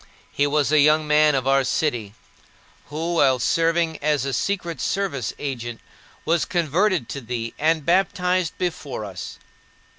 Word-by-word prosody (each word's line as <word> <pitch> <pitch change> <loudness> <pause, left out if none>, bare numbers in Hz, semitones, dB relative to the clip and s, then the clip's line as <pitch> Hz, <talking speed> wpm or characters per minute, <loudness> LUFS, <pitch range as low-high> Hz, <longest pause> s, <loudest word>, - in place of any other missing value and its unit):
He 145 - +1
was 145 0 +1
a 155 - +5
young 150 +1 +4
man 150 0 +4
of 130 -1 -1
our 135 0 +4
city, 120 -8 -1 0.7
who, 165 +3 -3
while 135 -4 +4
serving 165 +4 +1
as 145 -2 +1
a 135 - -2
secret 170 - -2
service 170 - -1
agent, 120 -5 -5 0.5
was 170 +1 +2
converted 175 - 0
to 140 - -5
thee 115 -1 -4
and 155 -1 +1
baptized 180 -1 +1
before 155 -10 -4
us. 95 -4 -8
150 Hz, 145 wpm, -23 LUFS, 135-170 Hz, 0.7 s, a